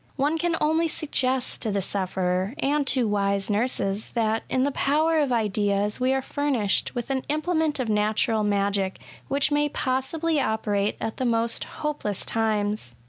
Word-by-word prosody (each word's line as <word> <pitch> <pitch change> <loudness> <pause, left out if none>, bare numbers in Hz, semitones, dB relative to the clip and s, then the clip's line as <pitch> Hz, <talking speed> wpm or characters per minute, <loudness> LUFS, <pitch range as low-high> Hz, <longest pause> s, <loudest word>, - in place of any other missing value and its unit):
One 295 +4 0
can 345 0 +1
only 320 +2 +2
suggest 265 -5 0
to 225 - -1
the 200 - -1
sufferer^ 185 +2 -1
and 285 0 0
to 255 -4 +2
wise 200 0 0
nurses, 205 -2 -1
that 225 -1 +1
in 255 - +1
the 285 - +1
power 310 +4 +2
of 285 -4 +1
ideas 205 -2 +1
we 255 +1 +2
are 265 0 0
furnished 265 -10 0
with 240 +2 -3
an 265 -1 0
implement 310 -1 0
of 255 - -1
natural 215 +1 +1
magic 200 -2 0 0.3
which 280 +1 +1
may 295 0 +2
possibly 290 +5 0
operate 210 -3 0
at 225 - -4
the 260 - -1
most 230 -1 +1
hopeless 295 -10 -3
times. 210 - -1
235 Hz, 160 wpm, -25 LUFS, 205-285 Hz, 0.3 s, only